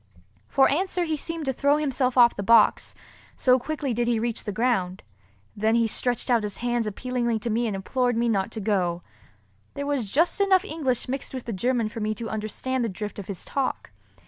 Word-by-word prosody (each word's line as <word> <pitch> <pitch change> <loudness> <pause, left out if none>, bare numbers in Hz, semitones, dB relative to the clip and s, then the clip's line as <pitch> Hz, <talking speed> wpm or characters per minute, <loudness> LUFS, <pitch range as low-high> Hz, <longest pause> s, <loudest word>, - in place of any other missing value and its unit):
For 270 - +4
answer 360 +4 0
he 320 -2 -1
seemed 330 +1 -5
to 265 - 0
throw 285 +3 +2
himself 265 -4 0
off 240 -1 +6
the - - -4
box, 225 +1 +4 0.4
so 255 0 +4
quickly 290 -1 -3
did 240 +1 0
he 240 -1 +2
reach 235 0 -3
the 210 - -2
ground. 200 -5 0 0.5
Then 220 +2 +1
he 230 -1 +3
stretched 245 +2 -1
out 240 -2 +3
his 205 -2 -5
hands 240 -2 -1
appealingly 235 +2 -1
to 220 +2 -3
me 235 +2 +1
and 210 - -2
implored 245 +5 0
me 235 +1 +1
not 195 -4 +1
to 220 - -5
go. 185 -5 0 0.7
There 280 - -3
was 275 -8 -1
just 340 +7 +2
enough 385 -1 +4
of 415 - -8
English 265 -7 -1
mixed 265 +1 -4
with 255 - -6
the 230 - -4
German 235 +3 0
for 215 +1 -7
me 215 0 -1
to 225 +1 -5
understand 230 +4 -2
the 230 - -1
drift 205 +2 -6
of 200 - -8
his 200 -4 -6
talk. 275 -2 -3
240 Hz, 215 wpm, -25 LUFS, 215-265 Hz, 0.7 s, off